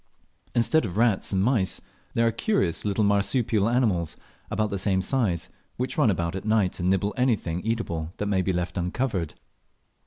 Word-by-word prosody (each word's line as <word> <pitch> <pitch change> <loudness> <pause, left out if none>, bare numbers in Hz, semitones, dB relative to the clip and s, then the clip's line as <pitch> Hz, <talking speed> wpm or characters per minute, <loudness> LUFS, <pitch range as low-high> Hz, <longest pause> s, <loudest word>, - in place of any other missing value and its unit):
Instead 130 +6 +3
of 100 -3 -4
rats 115 -4 +2
and 95 -1 +2
mice 105 -6 +1 0.4
there 115 - +3
are 115 - +3
curious 115 - 0
little 105 +1 +1
marsupial 100 +1 +2
animals 105 -10 +1 0.3
about 110 0 -1
the 100 - -2
same 95 0 +1
size, 95 -4 0 0.3
which 125 +1 -2
run 145 -7 +4
about 85 -2 -1
at 95 - -4
night 105 -4 +1
and 90 +1 +1
nibble 95 +2 +1
anything 110 -9 +1
eatable 85 -8 -2
that 105 - -2
may 100 -2 +1
be 95 - 0
left 90 +1 -2
uncovered. 90 - -2
100 Hz, 175 wpm, -26 LUFS, 90-115 Hz, 0.4 s, run